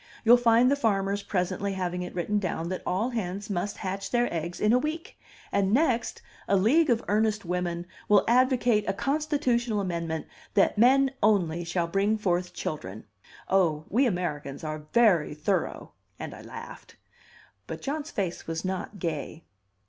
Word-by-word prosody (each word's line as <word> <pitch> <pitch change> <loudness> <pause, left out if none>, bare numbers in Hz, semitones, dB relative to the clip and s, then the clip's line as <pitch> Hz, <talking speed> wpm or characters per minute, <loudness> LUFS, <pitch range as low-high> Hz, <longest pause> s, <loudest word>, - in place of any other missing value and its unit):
You'll 235 +2 +9
find 240 +1 +4
the - - +4
farmers 200 -5 0
presently 195 0 -2
having 180 -1 -2
it 180 - -6
written 205 +4 0
down 170 -3 -3
that 185 - -3
all 205 +8 0
hens 205 -2 -4
must 195 +2 -2
hatch 195 +1 -4
their 240 -4 +1
eggs 170 +1 -4
in 215 +2 +3
a 250 - +5
week, 310 +4 -4 0.4
and 195 -1 +1
next, 250 -2 +1 0.2
a 200 - +3
league 270 - +4
of 235 -2 +2
earnest 215 -1 +1
women 175 -1 -2 0.2
will 205 -2 +5
advocate 245 -2 +3
a - - +1
Constitutional 260 -6 0
amendment 170 -4 -3 0.3
that 195 - +4
men 265 +5 +5
only 175 -6 +2
shall 170 0 -1
bring 195 +5 +1
forth 180 -3 0
children. 110 -9 -5 0.4
Oh, 165 -5 +2
we 255 +5 +3
Americans 150 - -3
are 155 -1 -5
very 195 -11 +3
thorough!" 185 +5 -2 0.3
And - - -6
I - - -10
laughed. - - -10 0.7
But - - -7
John's 295 +2 -3
face 185 -4 -3
was 165 +2 -3
not 190 +2 -4
gay. 160 -2 -4
195 Hz, 160 wpm, -27 LUFS, 175-235 Hz, 0.7 s, You'll